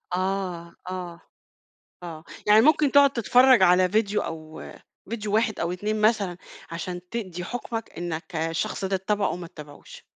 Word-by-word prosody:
آه، 185 -2 -3 0.2
آه، 180 -2 -6 0.8
آه. 165 -2 -8 0.2
يعني 210 +1 +7
ممكن 295 +2 +4
تقعد 280 -1 +7
تتفرّج 250 -2 +5
على 180 0 +5
فيديو 210 +1 +1
أو 155 -1 -7 0.5
فيديو 215 -2 -3
واحد 220 -1 +1
أو 170 +1 -1
2 210 +4 -2
مثلًا، 210 -5 +2 0.3
عشان 175 +2 -5
تدّي 185 -7 -5
حُكمَك 230 +1 -5
إنّك 170 0 -5
الشخص 165 +4 -2
ده 190 0 0
تتابعه 200 +2 0
أو - - -3
ما 175 -1 -7
تابعهوش. 145 -2 -12
190 Hz, 145 wpm, -25 LUFS, 170-220 Hz, 0.8 s, يعني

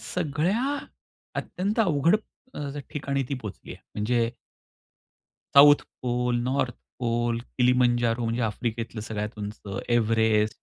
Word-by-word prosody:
सगळ्या 180 - 0 0.6
अत्यंत 200 +5 -3
अवघड 170 -2 +4 0.4
अ, 145 -1 -4
स 145 - -6
ठिकाणी 140 -2 -1
ती 140 - -1
पोहचली 105 -4 -8
आहे, - - -18
म्हणजे 115 +2 +1 1.3
south 145 +1 +9 0.2
pole, 125 0 0
north 130 0 0 0.2
pole, 120 -1 0 0.2
Kilimanjaro, 120 -1 +3
म्हणजे 115 +2 -1
आफ्रिकेतलं 115 +1 -3
सगळ्यात 105 0 -4
उंच, 105 +1 -6 0.3
एव्हरेस्ट. 110 -2 +2
120 Hz, 115 wpm, -26 LUFS, 115-145 Hz, 1.3 s, south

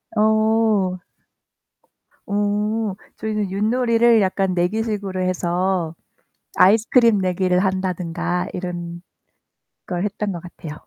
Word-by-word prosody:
어. 215 -3 +2 1.3
음. 205 +1 0 0.2
저희는 210 -3 -2
윷놀이를 230 +2 +3
약간 190 0 0
내기식으로 195 +1 -1
해서 180 -1 -1 0.6
아이스크림 225 +3 +5
내기를 185 -1 +1
한다든가 180 -2 -1
이런걸 175 -1 -7 0.8
했던 205 0 -2
것 175 - -6
같아요. 160 -3 -9
195 Hz, 215 characters per minute, -21 LUFS, 180-215 Hz, 1.3 s, 아이스크림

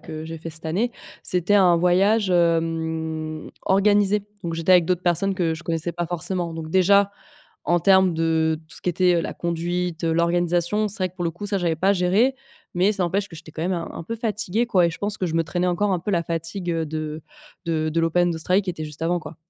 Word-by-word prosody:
que 155 -1 -7
j'ai 165 0 -7
fait 165 - -7
cette 160 +1 -11
année, 200 +10 0 0.3
c'était 180 +3 +1
un 180 -4 +5
voyage, 190 +4 +3
hem, 160 -2 -1 0.2
organisé, 205 +1 +3 0.2
donc 165 -1 -3
j'étais 165 +3 +2
avec 175 -2 +6
d'autres 180 -1 0
personnes 185 +3 +1
que 170 -3 0
je 165 +1 -7
connaissais 165 +1 -2
pas 175 0 -3
forcément, 175 0 -3
donc 160 -1 -6
déjà, 200 +2 +4 0.5
en 175 0 +2
termes 190 -1 +4
de 160 -1 +1
tout 155 - -7
ce - - -7
qui - - -2
était, 180 0 +3
heu, - - +2
la - - -5
conduite, 175 0 -2
heu, 165 - +1
l'organisation, 175 +4 +1
c'est 205 - -2
vrai 185 - +1
que 185 - -34
pour 175 - -3
le 165 - 0
coup 175 +5 -9
ça 205 -1 0
j'avais 170 -3 0
pas 190 +5 +1
à - - +5
gérer, 200 +8 +2 0.4
mais 185 +4 +2
ça 195 - -2
n'empêche 195 +3 -1
que 165 - -11
j'étais 160 0 -12
quand 160 - -5
même 185 - 0
un 170 -1 -4
un - - -7
peu 230 +7 -5
fatiguée, 220 0 -1
quoi 185 -7 +3
et - - 0
je - - -8
pense 205 +1 -3
que 185 - -1
je 165 - -4
me 165 - +2
traînais 175 +2 -1
encore 190 +3 +1
un 180 - +1
peu 205 - -3
la 170 -3 +1
fatigue, 170 +2 -4
heu, 165 -1 -1
de 155 0 -5 0.4
de 155 -1 0
de 165 - 0
l'Open 175 +2 +2
d'Australie, 180 +4 +1
qui 185 - -3
était 155 -3 -6
juste 150 +1 -7
avant, 175 +1 +1
quoi. 155 - -10
175 Hz, 245 wpm, -23 LUFS, 165-190 Hz, 0.5 s, avec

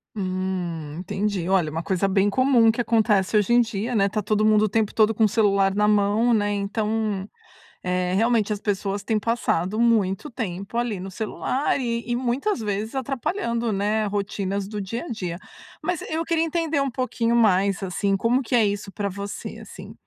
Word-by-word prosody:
Hum, 185 -5 -3
entendi. 190 -1 -2
Olha, 185 -5 +2
uma 165 +2 -3
coisa 190 +2 0
bem 195 +1 +2
comum 255 -2 +4
que 235 - -2
acontece 215 -3 +2
hoje 210 +3 +2
em 245 - +6
dia, 230 +1 -2
né. 200 -2 +3
Tá 210 +2 -2
todo 215 +1 +1
mundo 215 -1 +4
o 215 - -1
tempo 220 0 0
todo 220 0 +4
com 220 +1 +3
o - - +2
celular 200 -3 +2
na 210 0 +3
mão, 210 +3 +3
né. 205 -2 +1
Então, 210 0 -2 0.5
eh, 180 0 0
realmente 225 0 +2
as 205 - -6
pessoas 200 -1 -2
têm 215 +1 0
passado 215 -3 0
muito 220 +1 +2
tempo 200 -1 -5
ali 240 -4 -1
no 190 +1 -7
celular 240 +8 -1
e 235 -2 -3
e 240 - +1
muitas 255 - -1
vezes 210 +3 -3
atrapalhando, 245 - -2
né, 210 +2 0
rotinas 200 -1 -2
do 210 0 -5
dia 230 +5 -4
a - - -8
dia. 180 -7 -4 0.5
Mas, 360 -3 -1
eu 320 +1 -1
queria 330 -1 +1
entender 325 -2 -1
um 275 0 +1
pouquinho 235 -2 -1
mais, 200 -3 +3
assim, 195 +2 0
como 230 +6 +2
que 250 -1 -1
é 230 -3 +5
isso 200 0 -3
pra 200 -1 -2
você, 200 +1 -6
assim? - - -11
210 Hz, 190 wpm, -24 LUFS, 195-235 Hz, 0.5 s, em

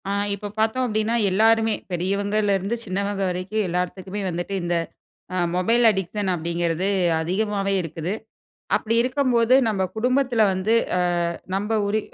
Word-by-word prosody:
ஆ - - 0 0.2
இப்போ 200 +1 -5
பாத்தோம் 225 +4 +1
அப்டின்னா, 215 +1 0 0.2
எல்லாருமே 225 +2 +3 0.2
பெரியவங்கலயிருந்து 200 +3 0
சின்னவங்க 200 +1 -2
வரைக்கும் 185 +4 -2
எல்லார்த்துக்குமே 180 +3 -3
வந்துட்டு 175 +3 -4
இந்த 175 0 0 0.8
மொபைல் 230 +7 +2
அடிக்ஷன் 195 0 -2
அப்டிங்கிறது 170 +2 -1 0.3
அதிகமாவே 195 +3 -1
இருக்குது. 165 +2 -4 0.6
அப்டி 225 +1 -1
இருக்கம்போது 255 -2 +2
நம்ப 200 -3 0
குடும்பத்துல 250 0 +2
வந்து, 190 +4 +1 0.2
ஆ - - +2 0.5
நம்ப 205 +3 -2 0.2
ஒரி 210 +2 +1
200 Hz, 120 wpm, -23 LUFS, 185-220 Hz, 0.8 s, எல்லாருமே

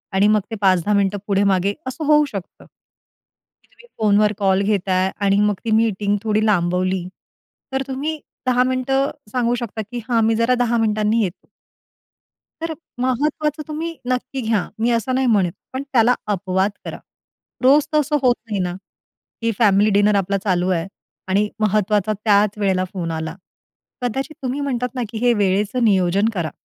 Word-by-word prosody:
आणि 195 +2 +4
मग 210 0 +3
ते - - -2
5:00-10:00 190 0 +3
मिनिटं 200 0 +1
पुढे 200 -1 +2
मागे, 195 0 +2
असं 265 +4 -4
होऊ 300 0 +5
शकतं 195 -6 -8
की - - -36
तुम्ही 480 - -20
फोनवर 210 0 +3
कॉल 195 -1 +2
घेता 200 -2 0
आहे 185 +1 +1
आणि 200 0 +3
मग 210 0 +2
ती 225 - -1
मीटिंग 210 -2 +2
थोडी 215 -1 +1
लांबवली, 180 -2 +1 0.7
तर 265 - 0
तुम्ही 290 +4 -3 0.3
10:00 250 0 +4
मिनिटं 260 +2 0 0.2
सांगू 245 -1 +1
शकता 230 -2 -4
की 245 - -4
हां, 230 -2 +3
मी 225 0 +2
जरा 230 +3 +2
10:00 235 0 +1
मिनिटांनी 215 0 +1
येतो. 180 -4 -6 1.1
तर 330 0 -2 0.3
महत्त्वाचं 300 +4 0
तुम्ही 325 +2 -4
नक्की 255 +1 -2
घ्या, 220 -5 0
मी 230 +2 +1
असं 235 +2 0
नाही 260 0 +1
म्हणत, 200 -7 +2 0.2
पण 260 +1 -3
त्याला 245 -1 +4 0.2
अपवाद 190 +1 0
करा. - - -6 0.6
रोज 280 +3 +5
तसं 300 0 +2
होत 250 -2 +4
नाही 210 -3 -3
ना, 180 -1 -2 0.7
की 230 - +1
फॅमिली 210 -1 +4
डिनर 205 +1 +3
आपला 200 0 0
चालू 180 -2 +1
आहे 170 -2 0 0.4
आणि 200 +2 +2
महत्त्वाचा 210 0 +1
त्याच 210 -1 +3
वेळेला 190 -3 +1
फोन 175 -4 -3
आला. 160 0 -4 0.7
कदाचित 270 +5 -3
तुम्ही 260 +2 -2
म्हणतात 250 -3 -1
ना, 250 - -2
की 220 - -5
हे 240 - +5
वेळेचं 205 +4 +1
नियोजन 195 0 +3
करा. 170 -5 -2
215 Hz, 165 wpm, -20 LUFS, 195-250 Hz, 1.1 s, होऊ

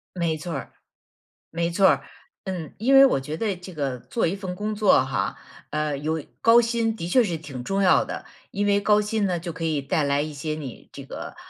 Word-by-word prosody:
没 170 -3 0
错 165 +2 -6
儿， - - -6 0.8
没 170 +1 -1
错 190 +2 +5
儿， 140 -2 +3 0.4
嗯。 180 -6 -5
因 250 +6 +2
为 270 - +10
我 260 - +2
觉 150 +4 -5
得 215 -4 -1
这 180 +1 -11
个 135 -5 -3
做 225 - -1
一 185 - -1
份 190 -2 -5
工 210 +3 -3
作 205 -10 +4
哈， 115 -8 -2 0.3
呃 150 -1 -1
有 155 +1 -2 0.2
高 230 +1 +7
薪 230 -1 0
的 170 -5 -5
确 245 +7 +4
是 170 -6 -2
挺 135 -6 -8
重 195 +5 -1
要 185 - +5
的， - - -7 0.3
因 205 +1 -1
为 200 0 +3
高 210 +1 +4
薪 210 0 0
呢， 180 -3 0
就 170 -1 -6
可 165 +1 -6
以 155 -3 0
带 145 +2 0
来 140 0 +1
一 155 0 -4
些 155 +2 -3
你 140 -6 -9
这 - - -9
个， - - -8
170 Hz, 240 characters per minute, -24 LUFS, 150-205 Hz, 0.8 s, 为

